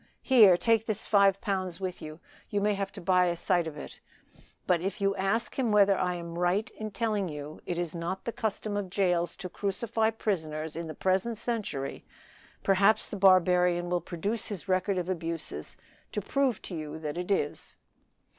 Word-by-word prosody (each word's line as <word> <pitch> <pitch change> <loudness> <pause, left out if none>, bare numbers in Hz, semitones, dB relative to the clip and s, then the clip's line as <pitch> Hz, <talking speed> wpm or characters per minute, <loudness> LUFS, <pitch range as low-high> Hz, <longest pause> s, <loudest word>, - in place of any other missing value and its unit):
here, 215 -9 +7
take 225 +2 +2
this 215 -1 -2
five 200 -2 +4
pounds 185 -5 -2
with 185 -2 -4
you; 155 +1 -8 0.3
you 205 - 0
may 205 +1 +2
have 195 -1 -3
to - - -9
buy 180 0 +3
a 175 - 0
sight 175 -1 +1
of 155 -2 -7
it; - - -9 0.7
but 175 -2 +2
if 195 +2 -3
you 195 0 +1
ask 200 +7 -1
him 240 -4 +1
whether 200 -1 +5
I 180 -1 0
am 170 0 -6
right 180 +5 +1
in 215 0 -6
telling 210 -4 -1
you 150 0 -8
it 175 - -2
is 175 -2 -2
not 175 +2 -4
the 235 - -1
custom 215 -2 -3
of 205 -2 -2
jails 180 -3 +1
to 185 - -6
crucify 220 +4 -1
prisoners 160 -8 -3
in 165 0 -4
the 155 - -7
present 190 +5 0
century, 210 - -3 0.6
perhaps 200 +2 +4
the - - -6
barbarian 180 -2 +4
will 175 -1 +1
produce 195 +7 -2
his 200 -4 -5
record 185 +1 +1
of 180 -1 -2
abuses 165 - -4 0.4
to - - 0
prove 260 +2 0
to 180 - -6
you 155 -1 -5
that 150 -2 -5
it 180 +2 -4
is. 165 -7 -1
185 Hz, 190 wpm, -29 LUFS, 170-205 Hz, 0.7 s, here